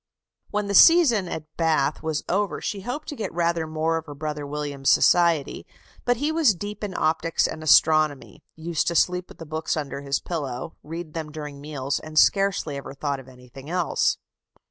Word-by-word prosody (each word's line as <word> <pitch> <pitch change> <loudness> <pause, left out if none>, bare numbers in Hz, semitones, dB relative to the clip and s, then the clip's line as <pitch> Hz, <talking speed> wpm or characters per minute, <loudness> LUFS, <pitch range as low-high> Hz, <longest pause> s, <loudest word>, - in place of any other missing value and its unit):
When 210 0 -1
the 200 - -3
season 250 - +6
at 160 -2 -5
Bath 155 -3 +1
was 160 -1 -2
over, 200 +1 0
she 200 - -4
hoped 250 +9 -5
to 295 - -5
get 225 - -4
rather 170 -1 0
more 160 +1 0
of 160 0 -7
her 145 - -8
brother 150 0 -4
William's 145 -2 -2
society; 170 -5 +3 0.4
but 245 -1 +2
he 290 +5 0
was 315 - +3
deep 205 +4 -7
in 195 -3 -4
optics 160 +1 +1
and 155 - -7
astronomy, 155 -2 +3
used 160 0 -2
to 170 - 0
sleep 180 +1 +1
with - - -14
the 165 - -9
books 160 +1 -2
under 140 -2 -4
his 140 -1 -1
pillow, 145 -2 -5
read 165 0 -7
them 160 -2 -5
during 150 -2 -8
meals, 140 -2 -3
and 155 0 -9
scarcely 195 -6 +3
ever 135 0 -8
thought 140 -1 -2
of 135 - -13
anything 125 +2 -13
else. 180 -1 +1
160 Hz, 190 wpm, -24 LUFS, 145-180 Hz, 0.4 s, season